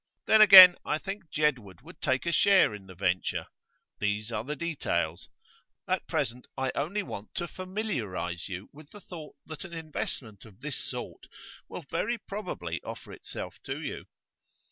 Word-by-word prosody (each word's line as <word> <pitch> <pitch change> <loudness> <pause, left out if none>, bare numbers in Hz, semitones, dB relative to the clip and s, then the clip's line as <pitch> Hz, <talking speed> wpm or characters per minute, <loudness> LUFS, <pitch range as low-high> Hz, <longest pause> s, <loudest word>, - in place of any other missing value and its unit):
Then 220 - +6
again, 190 -4 +12
I 150 - 0
think 195 0 -7
Jedwood 125 - -1
would - - -14
take 130 +4 0
a 170 - +1
share 195 - +5
in 100 -2 -10
the 95 - -12
venture. 90 0 -1 0.5
These 105 +2 -1
are 110 -1 -2
details. 85 - -2 0.6
At - - -1
present 125 +2 -2
I 135 -1 0
only 190 +9 -1
want 105 - -8
to 175 - -2
familiarise 125 - -4
you 95 +1 -6
with 145 0 -14
the 205 - -12
thought 160 -5 -10
that 155 +2 -8
an 185 -3 -10
investment 145 - -5
of 110 -1 -17
this 150 -1 -4
sort - - -7 0.4
will 175 - -7
very 205 +11 -2
probably 205 0 -5
offer - - -8
itself - - -8
to - - -4
you. - - -6
150 Hz, 160 wpm, -29 LUFS, -, 0.6 s, again